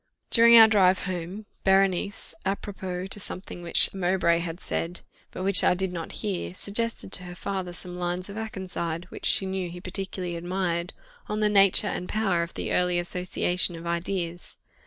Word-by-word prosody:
During 235 0 +7
our 225 -1 +10
drive 190 -4 +3
home, 185 +3 -5 0.2
Berenice, 195 0 +1
apropos 190 -2 -4
to 195 +2 -2
something 185 -2 -5
which 170 -1 +4
Mowbray 180 -2 +1
had 170 0 -5
said, 175 -1 -4 0.3
but 185 - -6
which 195 -1 +6
I - - +4
did 190 0 -2
not 165 -2 -5
hear, 190 -3 -3
suggested 220 +1 -3
to 180 - -4
her 175 0 -8
father 190 -1 -4
some 180 0 -6
lines 180 +1 -2
of 200 - -8
Akenside, 185 -6 -4
which - - -3
she 195 - +3
knew 190 -2 -3
he 175 +1 -8
particularly 185 -1 -5
admired, 175 0 -2 0.4
on 210 - -2
the 210 -1 +3
nature 200 0 +6
and 180 -3 -3
power 195 -5 +1
of 170 0 -5
the - - -3
early 180 -1 +2
association 180 0 -1
of 165 +1 -9
ideas. 170 0 -3
185 Hz, 175 wpm, -26 LUFS, 175-195 Hz, 0.4 s, our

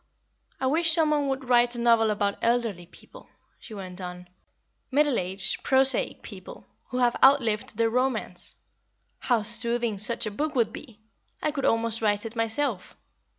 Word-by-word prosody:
I 265 - -2
wish 320 +4 +2
some 315 -2 +3
one 295 -2 +1
would 265 -1 -3
write 245 0 +3
a - - -5
novel 230 -2 +3
about 205 -1 -1
elderly 230 -7 -1
people," - - -16 0.3
she 220 - -11
went 185 -2 -8
on 180 0 -8 0.6
"middle 285 -1 +2
aged, 185 +2 -1
prosaic 270 - +2
people, - - -11 0.2
who 250 - -5
have 245 -1 +2
outlived 230 -6 +3
their 230 0 +1
romance. 255 +2 -2 0.6
How 235 -4 0
soothing 235 -1 -1
such 235 +2 -1
a 215 - -3
book 300 +7 -3
would 230 -3 +1
be! 230 -7 -12 0.4
I 305 - +1
could 285 -2 -3
almost 230 0 +1
write 210 0 0
it 225 +1 -7
myself. 225 -2 -2
235 Hz, 160 wpm, -26 LUFS, 215-265 Hz, 0.6 s, some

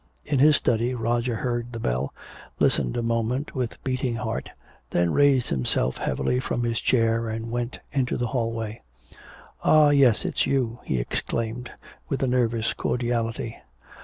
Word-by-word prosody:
In 145 -3 0
his 150 +2 +7
study 120 -1 +1
Roger 120 +1 0
heard 120 +1 -2
the 115 - -5
bell, 65 - -1 0.5
listened 60 -2 +2
a 120 - -1
moment 115 +4 -1
with 125 -4 -3
beating 130 -2 -1
heart, 110 - -3 0.4
then 85 -1 +1
raised 140 -3 +4
himself 65 -1 0
heavily 125 - 0
from 120 -1 -2
his 115 -2 0
chair 115 -2 +2
and 115 +1 -4
went 120 +1 -3
into 130 -3 0
the 125 - -1
hallway. 115 -2 -2 0.8
"Ah, 150 -1 +6
yes! 135 -6 +4
It's - - 0
you!" 125 -3 0
he 65 - 0
exclaimed, 115 - -3 0.4
with 135 - -1
a - - +2
nervous 115 -3 +1
cordiality. 115 -2 -2
120 Hz, 150 wpm, -25 LUFS, 115-125 Hz, 0.8 s, his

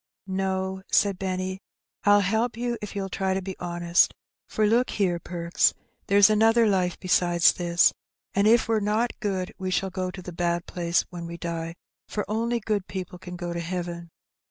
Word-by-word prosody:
''No," 190 0 -2
said 200 -3 +3
Benny. 185 0 -3 0.5
"1^1 205 0 +7
help 220 +4 0
you 240 0 -1
if 210 - -7
you'll 195 -1 -2
try 190 0 -1
to - - 0
be 190 0 -5
honest; 175 0 +2 0.3
for 215 - +1
look 235 +4 +3
here. 180 -4 0
Perks: 170 0 +1 0.3
there's 200 0 +7
another 225 +2 +4
life 185 -4 +1
besides 175 -1 +4
this, 175 0 +3 0.4
an' 200 +1 +3
if 230 +1 +5
we're 225 -1 +2
not 215 +4 0
good 190 -3 -2
we 185 0 -2
shall 190 +1 0
go 185 -1 -2
to 185 0 -9
the 180 - -7
bad 170 0 -1
place 170 -1 0
when 170 -1 -6
we 170 0 -7
die, 165 0 -4 0.3
for 210 - -3
only 230 +3 0
good 210 -3 -2
people 180 -1 -6
can 180 -1 -8
go 175 -1 -4
to 170 - -3
heaven. 170 0 -4
190 Hz, 180 wpm, -26 LUFS, 175-205 Hz, 0.5 s, 1^1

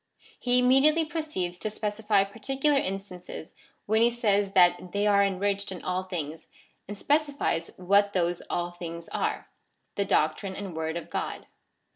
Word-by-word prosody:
He 250 0 +3
imme 260 +2 +5
diately 310 +2 +4
proceeds 300 - -3
to 215 - -2
specify 210 -1 +1
particular 270 +8 0
instances, 190 -5 -6 0.3
when 220 +2 +2
he 235 - +6
says 205 -4 +1
that 180 -1 +4
they 205 +1 +1
are 200 -1 +5
enriched 200 +1 -1
in 185 - -7
all 185 +1 -2
tilings, 160 -4 -5 0.4
and 205 +1 -6
specifies 285 - 0
what 200 +2 +3
those 175 -1 0
all 175 0 -1
things 170 -1 -7
are - - -2 0.3
— - - -45
the 200 - +1
doctrine 175 +5 +1
and 195 -4 -6
word 160 +1 -2
of 170 - -8
God. - - -3
200 Hz, 160 wpm, -27 LUFS, 175-225 Hz, 0.4 s, he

